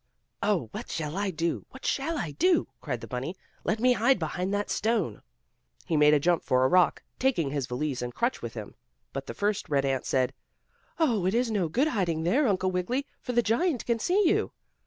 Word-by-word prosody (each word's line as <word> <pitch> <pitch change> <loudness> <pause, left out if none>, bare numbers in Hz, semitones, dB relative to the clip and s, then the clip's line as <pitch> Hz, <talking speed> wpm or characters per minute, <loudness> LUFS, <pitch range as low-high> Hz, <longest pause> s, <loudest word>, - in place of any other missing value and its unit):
"Oh, 195 - +1
what - - -7
shall 155 0 -3
I 200 0 0
do? 165 -1 -2
What 265 - -12
shall 320 +4 0
I 165 - -3
do?" 350 - +2
cried 125 -6 -3
the 115 - -7
bunny. 130 +9 -4 0.3
"Let 215 - 0
me 250 +2 +5
hide 245 +3 +3
behind 180 +3 -2
that 205 0 -1
stone." 215 - 0 0.6
He 165 - 0
made 150 0 +6
a - - +4
jump 170 +2 +2
for 130 0 +3
a - - +6
rock, 180 +3 +3 0.2
taking 205 - +1
his 140 -3 -2
valise 130 +1 -2
and 120 0 -3
crutch 235 - -1
with 115 -1 -6
him, 110 -3 -7 0.4
but 135 - -5
the - - -6
first 205 0 -1
red 140 -2 +2
ant 135 -1 -1
said: 130 0 +1 0.7
"It 215 - +2
is 240 -1 +1
no 190 -6 0
good 270 - +2
hiding 170 - 0
there, 250 - +3
Uncle 185 -2 +1
Wiggily, 210 +10 -1 0.2
for 250 - -4
the 240 0 +3
giant 245 - +1
can 235 -1 +1
see 370 - +3
you." 415 +5 +1
185 Hz, 210 wpm, -28 LUFS, 150-240 Hz, 0.7 s, made